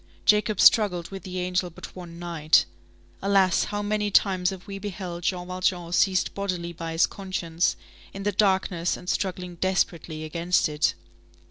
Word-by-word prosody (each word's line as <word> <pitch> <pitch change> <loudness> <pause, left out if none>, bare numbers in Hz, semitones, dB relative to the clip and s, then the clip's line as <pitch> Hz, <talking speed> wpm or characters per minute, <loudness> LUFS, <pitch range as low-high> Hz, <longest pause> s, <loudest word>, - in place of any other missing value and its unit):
Jacob 210 -1 +3
struggled 180 -6 +5
with 195 -1 -6
the 185 +1 -6
angel 180 0 -1
but 165 - -11
one 175 -2 -9
night. 165 -3 +2 0.6
Alas! 195 -2 +3
how 205 0 -3
many 210 0 0
times 185 -3 +3
have 190 -2 -8
we 195 -1 -7
beheld 185 -3 -6
Jean 180 0 -1
Valjean 180 -1 -1
seized 185 +1 +2
bodily 180 -4 -3
by 165 0 -5
his 165 - +4
conscience, 180 -3 -2 0.4
in 195 - -7
the 205 - +1
darkness, 190 -3 +1
and 180 - -13
struggling 180 -2 -2
desperately 170 -4 -1
against 170 +3 +1
it! 150 +1 +1
180 Hz, 155 wpm, -26 LUFS, 170-195 Hz, 0.6 s, struggled